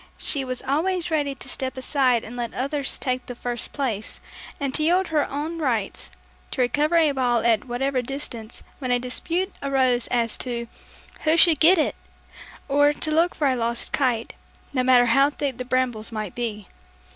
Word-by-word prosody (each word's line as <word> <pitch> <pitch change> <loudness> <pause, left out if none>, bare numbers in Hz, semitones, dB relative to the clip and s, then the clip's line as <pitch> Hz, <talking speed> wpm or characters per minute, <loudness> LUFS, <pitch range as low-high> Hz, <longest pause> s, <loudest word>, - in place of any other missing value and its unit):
She 280 -3 +2
was 255 -1 -4
always 335 +6 0
ready 290 -3 0
to - - -9
step 260 0 -3
aside 260 -3 +2
and 230 - -9
let 240 -1 -4
others 275 +1 -1
take 255 -1 -2
the 245 - -6
first 240 0 -4
place, 235 -7 -3 0.4
and 275 -2 -2
to 310 - 0
yield 355 +4 +3
all - - -11
her 300 -2 +1
own 310 +4 -4
rights, 235 -9 -2 0.4
to 260 - -2
recover 295 +6 +1
a 320 -3 +5
ball 245 -4 +1
at 225 -3 +3
whatever 255 +2 -1
distance 245 -4 -5 0.2
when 255 -3 -4
a 245 - +4
dispute 335 +10 -2
arose 260 -3 +1
as 230 -2 0
to, 235 -2 -3 0.6
"Who 315 +2 +4
should 330 -4 +5
get 350 +4 +6
it?" 310 - +1 0.7
or 290 +1 +4
to 310 +1 -2
look 335 +3 +2
for 295 - +1
a 260 - +2
lost 235 -1 -1
kite, 245 -5 0 0.4
no 255 - +2
matter 250 -1 +6
how 275 +4 +4
thick 280 -3 -4
the 250 - -3
brambles 250 -4 -1
might 215 -4 -4
be. 215 -4 -4
260 Hz, 185 wpm, -24 LUFS, 240-295 Hz, 0.7 s, get